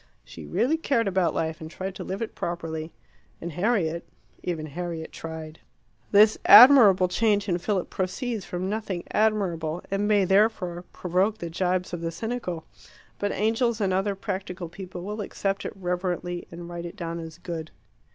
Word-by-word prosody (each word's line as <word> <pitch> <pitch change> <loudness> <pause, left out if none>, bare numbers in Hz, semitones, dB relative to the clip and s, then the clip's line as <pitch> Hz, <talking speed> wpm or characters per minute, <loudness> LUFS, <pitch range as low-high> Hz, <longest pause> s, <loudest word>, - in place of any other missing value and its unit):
She - - -11
really 280 +7 +1
cared 255 -8 +1
about 185 -3 +2
life, 160 -1 -2
and 160 - -7
tried 190 +3 -5
to - - -7
live 195 +4 -3
it 225 - -6
properly. 165 -2 -4 0.5
And 170 - -5
Harriet 175 -3 0 0.4
even 165 -4 -3
Harriet 165 +1 -5
tried. 160 -1 -8 0.5
This 210 +1 +6
admirable 210 -5 +9
change 205 +2 +1
in 175 -2 0
Philip 185 0 -1
proceeds 210 +4 -2
from 180 +1 -4
nothing 200 -4 -3
admirable, 180 -7 0
and 200 +1 0
may 205 -2 +4
therefore 190 -3 +2
provoke 185 +4 0
the 170 -5 -6
gibes 180 +1 -1
of 175 - -3
the 165 - -1
cynical. 180 -2 -4 0.5
But 205 0 0
angels 225 +2 +1
and 195 -3 +1
other 195 +2 0
practical 185 -2 -5
people 180 0 -8
will 210 +3 -4
accept 195 0 -2
it - - -4
reverently, 180 -1 -3
and 170 0 -9
write 175 0 -6
it 170 - -10
down 170 -3 -4
as 160 -1 -8
good. 170 -3 -6
185 Hz, 165 wpm, -26 LUFS, 170-205 Hz, 0.5 s, admirable